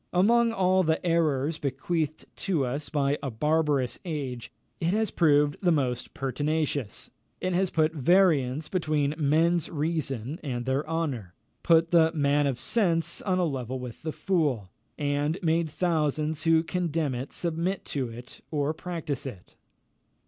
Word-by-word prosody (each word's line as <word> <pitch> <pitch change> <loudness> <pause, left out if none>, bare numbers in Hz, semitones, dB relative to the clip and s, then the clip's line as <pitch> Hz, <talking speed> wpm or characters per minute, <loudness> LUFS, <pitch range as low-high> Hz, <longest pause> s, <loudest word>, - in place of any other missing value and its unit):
Among 230 +6 +4
all 185 -3 +3
the 160 0 0
errors 160 -3 +1
bequeathed 155 +3 -2
to 165 -9 0
us 140 +4 -3
by 145 -1 0
a 140 - -3
barbarous 150 +1 +1
age, 140 -9 -5 0.3
it 165 - -1
has 220 -1 0
proved 145 -3 +3
the 180 -3 +3
most 130 -6 -1
pertinacious. 145 -2 -2 0.3
It 185 0 -1
has 185 +1 +2
put 155 -1 +1
variance 155 -3 +3
between 155 -5 0
men's 160 +2 +2
reason 150 -4 -2
and 125 -5 -3
their 135 +3 -1
honour; 135 - -3 0.3
put 165 0 +4
the 165 -2 +5
man 145 -1 +2
of 135 -3 -1
sense 170 - +1
on 185 -2 0
a 180 - +2
level 130 -4 -3
with 125 -3 -8
the 155 - -3
fool, 145 - 0 0.3
and 145 +2 0
made 165 0 +2
thousands 155 -2 0
who 165 0 +4
condemn 165 -4 -1
it 125 +3 -5
submit 170 +3 -2
to 130 -4 -1
it 120 +2 -11
or 150 0 0
practise 160 -4 -4
it. 100 -9 -10
155 Hz, 150 wpm, -27 LUFS, 140-170 Hz, 0.3 s, the